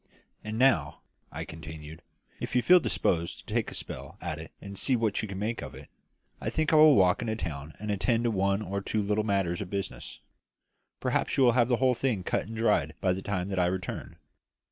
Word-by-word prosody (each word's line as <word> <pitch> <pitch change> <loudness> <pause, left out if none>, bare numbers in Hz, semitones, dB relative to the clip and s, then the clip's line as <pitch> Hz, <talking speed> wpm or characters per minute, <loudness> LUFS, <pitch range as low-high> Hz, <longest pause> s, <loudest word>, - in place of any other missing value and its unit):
And 110 +1 -4
now," 120 - +2 0.3
I - - -5
continued, 80 0 -9 0.4
"if - - -4
you 125 - +3
feel 180 0 +7
disposed 85 - 0
to - - -7
take - - 0
a - - -7
spell - - -7
at 80 - -4
it 80 - -9
and 100 0 -9
see 130 +6 +2
what 110 -3 0
you 110 - -4
can 95 -1 -6
make 110 +4 -2
of - - -8
it, - - -12 0.5
I - - -1
think 155 0 0
I - - +7
will 155 -2 +8
walk 90 -2 +4
into 110 -2 -1
the 110 - -7
town 75 -2 -5
and 105 +1 -4
attend 115 +4 +1
to 120 - +2
one 100 0 +1
or 100 0 -3
two 110 - -1
little 105 +1 +1
matters 95 -4 0
of 95 - -5
business. 100 0 -5 0.8
Perhaps - - 0
you 135 - +5
will 120 - +6
have 120 0 +3
the 120 - +3
whole 130 0 +3
thing 115 -6 -1
cut - - -1
and 115 - -7
dried 115 0 +2
by 95 - +2
the 95 - -4
time 95 -1 -2
that 95 -2 -1
I 90 - +3
return." 90 -3 -4
100 Hz, 230 wpm, -29 LUFS, 90-115 Hz, 0.8 s, will